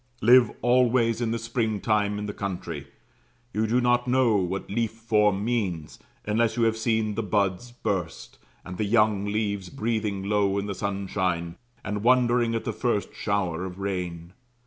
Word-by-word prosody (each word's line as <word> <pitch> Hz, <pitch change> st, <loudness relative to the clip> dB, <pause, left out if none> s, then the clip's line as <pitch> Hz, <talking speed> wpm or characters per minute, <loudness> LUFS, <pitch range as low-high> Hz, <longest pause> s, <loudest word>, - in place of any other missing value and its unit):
Live 120 Hz, 0 st, +7 dB
always 120 Hz, -1 st, +3 dB
in 115 Hz, -, 0 dB
the 115 Hz, -, -1 dB
springtime 110 Hz, -3 st, 0 dB
in 105 Hz, -, -4 dB
the 105 Hz, -, -4 dB
country; 85 Hz, -8 st, -5 dB, 0.7 s
you 110 Hz, +1 st, 0 dB
do 120 Hz, +3 st, +2 dB
not 120 Hz, 0 st, +2 dB
know 125 Hz, -3 st, +3 dB
what 95 Hz, 0 st, -2 dB
leaf 115 Hz, +2 st, -1 dB
form 105 Hz, -3 st, +1 dB
means, 95 Hz, -10 st, -2 dB, 0.3 s
unless 110 Hz, +3 st, +1 dB
you 120 Hz, -, +2 dB
have 115 Hz, -1 st, +3 dB
seen 110 Hz, -1 st, 0 dB
the 115 Hz, -, -2 dB
buds 100 Hz, +2 st, -1 dB
burst, 85 Hz, -, -4 dB, 0.3 s
and 90 Hz, 0 st, -8 dB
the -, -, +1 dB
young 105 Hz, -2 st, +2 dB
leaves 100 Hz, -2 st, -2 dB
breathing 110 Hz, -6 st, -2 dB
low 100 Hz, -1 st, +1 dB
in 100 Hz, -, -1 dB
the 100 Hz, -, -3 dB
sunshine, 95 Hz, -4 st, -2 dB, 0.3 s
and 105 Hz, -1 st, -3 dB
wondering 120 Hz, -1 st, +3 dB
at 115 Hz, -, -2 dB
the -, -, -3 dB
first 120 Hz, -5 st, -1 dB
shower 95 Hz, -5 st, -1 dB
of 95 Hz, -1 st, -6 dB
rain. 90 Hz, -3 st, -4 dB
105 Hz, 165 wpm, -26 LUFS, 95-115 Hz, 0.7 s, Live